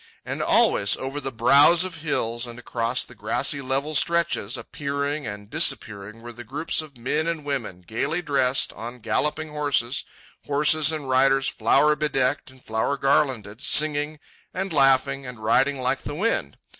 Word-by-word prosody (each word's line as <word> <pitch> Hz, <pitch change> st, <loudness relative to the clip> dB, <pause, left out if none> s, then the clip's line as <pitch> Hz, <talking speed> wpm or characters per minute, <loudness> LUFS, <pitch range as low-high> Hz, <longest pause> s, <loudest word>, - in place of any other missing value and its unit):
And -, -, -4 dB
always, 100 Hz, 0 st, +3 dB
over 135 Hz, +2 st, -4 dB
the 135 Hz, -, -4 dB
brows 140 Hz, +9 st, +5 dB
of 185 Hz, -3 st, -5 dB
hills 125 Hz, -6 st, -2 dB
and 120 Hz, 0 st, -9 dB
across 120 Hz, 0 st, -2 dB
the -, -, -13 dB
grassy 120 Hz, +6 st, +1 dB
level 135 Hz, +3 st, -2 dB
stretches, 170 Hz, -8 st, +1 dB
appearing 140 Hz, 0 st, -4 dB
and 105 Hz, -1 st, -7 dB
disappearing, 110 Hz, -6 st, 0 dB
were 120 Hz, -, -8 dB
the 120 Hz, +1 st, -10 dB
groups 145 Hz, +8 st, -1 dB
of 150 Hz, -4 st, -13 dB
men 145 Hz, +7 st, -1 dB
and 165 Hz, -3 st, -3 dB
women, 125 Hz, -11 st, -4 dB
gaily 140 Hz, -, -3 dB
dressed, 135 Hz, -4 st, +1 dB
on 120 Hz, +2 st, -8 dB
galloping 150 Hz, +7 st, -2 dB
horses, 145 Hz, -4 st, -1 dB, 0.4 s
horses 150 Hz, +2 st, +3 dB
and 155 Hz, -3 st, -5 dB
riders 135 Hz, +1 st, +3 dB
flower 150 Hz, +2 st, +2 dB
bedecked 140 Hz, -2 st, -1 dB
and 130 Hz, -1 st, -17 dB
flower 110 Hz, +6 st, -1 dB
garlanded, 130 Hz, -6 st, 0 dB
singing, 150 Hz, 0 st, +2 dB, 0.4 s
and 190 Hz, -1 st, -3 dB
laughing, 135 Hz, -1 st, +2 dB
and 120 Hz, -3 st, -9 dB
riding 135 Hz, +5 st, +2 dB
like 130 Hz, +1 st, 0 dB
the 145 Hz, -, -7 dB
wind. 220 Hz, +8 st, -1 dB
135 Hz, 155 wpm, -24 LUFS, 120-150 Hz, 0.4 s, brows